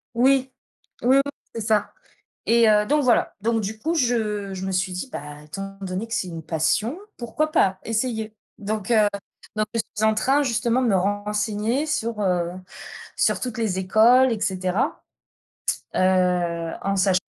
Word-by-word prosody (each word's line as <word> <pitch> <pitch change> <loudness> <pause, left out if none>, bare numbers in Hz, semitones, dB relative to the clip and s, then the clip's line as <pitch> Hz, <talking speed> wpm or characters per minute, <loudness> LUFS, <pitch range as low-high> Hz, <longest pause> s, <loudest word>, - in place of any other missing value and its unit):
Oui. 265 +2 +3 0.5
Oui, 260 +3 +4
oui, - - +6 0.3
c'est 230 - -4
ça 210 -1 +1 0.6
et 230 -1 +5
heu, 210 0 +4
donc 295 +1 +2
voilà. 245 - +2
Donc 225 +1 +1
du 215 +2 -4
coup, 325 +3 -1
je 215 - 0
je 190 +1 -5
me - - -2
suis 185 0 0
dit: 180 +9 -4
«Bah, 150 +1 -7
étant 195 +5 -8
donné 190 +3 -4
que 225 - -3
c'est 220 -6 -1
une 165 -2 -7
passion, 165 - 0 0.2
pourquoi 275 +6 -2
pas? 190 -7 +3
Essayer». 220 -1 -2 0.2
Donc 210 +1 -4
heu, 215 -2 +5 0.5
donc 215 0 +1
je 230 - +2 0.2
suis 215 - 0
en 220 - +3
train, 270 +7 +2
justement, 240 0 +1
de 250 - +1
me 205 - +3
renseigner 210 +6 -1
sur, 230 -7 -2
heu, 175 -3 0 0.6
sur - - +2
toutes 245 -2 -4
les 210 -5 0
écoles 230 +7 +5
et 220 - -3
cetera. 185 +2 -1 0.9
Heu, 180 -3 +1
en 195 0 0
sach 190 -1 +3
215 Hz, 170 wpm, -23 LUFS, 190-235 Hz, 0.9 s, oui